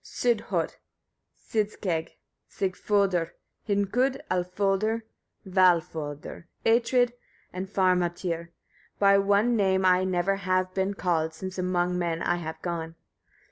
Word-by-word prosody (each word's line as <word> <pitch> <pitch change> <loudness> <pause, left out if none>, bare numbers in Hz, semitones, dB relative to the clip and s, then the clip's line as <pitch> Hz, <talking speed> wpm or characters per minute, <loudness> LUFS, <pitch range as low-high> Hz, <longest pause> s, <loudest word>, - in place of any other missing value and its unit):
Sîdhött, 240 -3 -1 0.6
Sîdskegg 200 -6 -2 0.4
Sigfödr, 190 -2 0 0.3
Hnikud, 220 +6 +1
Alfodr, 195 +5 0 0.4
Valfödr, 170 -5 +1 0.2
Atrid 240 +2 +3 0.4
and 185 +1 -5
Farmatyr; 175 -3 0 0.5
by 200 0 +5
one 205 +4 +3
name 190 -3 +2
I 185 0 +4
never 185 +1 +1
have 185 -1 0
been 190 +1 -1
called, 160 -4 0
since 185 +2 -6
among 180 0 0
men 170 -1 -1
I 175 - +1
have 160 -1 -6
gone. 165 -2 -4
185 Hz, 100 wpm, -27 LUFS, 175-200 Hz, 0.6 s, by